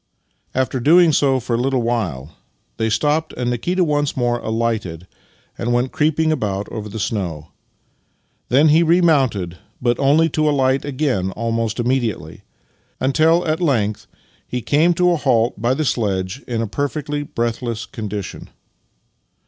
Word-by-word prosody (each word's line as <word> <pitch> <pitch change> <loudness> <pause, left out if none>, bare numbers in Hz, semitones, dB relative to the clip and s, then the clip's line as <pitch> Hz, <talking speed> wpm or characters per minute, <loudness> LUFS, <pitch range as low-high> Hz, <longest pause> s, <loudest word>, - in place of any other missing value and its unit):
After 130 0 0
doing 165 +5 +5
so 135 -2 +3
for 120 -1 -2
a - - -1
Httle 130 -1 0
while 85 - -2 0.4
they 110 0 0
stopped, 150 +7 0
and 125 0 -1
Nikita 175 +10 0
once 145 -3 0
more 120 -1 +1
alighted 110 -8 -2 0.5
and 120 +1 -1
went 125 +2 +1
creeping 155 +1 +1
about 105 -9 -2
over 105 -2 -5
the 105 - -7
snow. 85 -8 -3 1.0
Then 145 +6 +5
he 155 +3 +5
remounted, 140 - +2 0.2
but 120 -1 0
only 145 +4 +4
to 155 - -2
ahght 135 -2 +2
again 130 -9 -1
almost 115 0 -2
immediately; 120 -3 -2 0.6
until 160 +6 +3
at 155 +1 -1
length 110 -10 0 0.4
he 125 - -3
came 165 +4 +3
to 180 +1 +3
a 170 - +2
halt 120 -6 +1
by 120 +3 +2
the 155 - -1
sledge 100 -1 -1
in 115 -2 -1
a - - -3
perfectly 145 +4 -3
breathless 115 -3 -3
condition. 105 -3 -6
125 Hz, 145 wpm, -20 LUFS, 110-150 Hz, 1.0 s, doing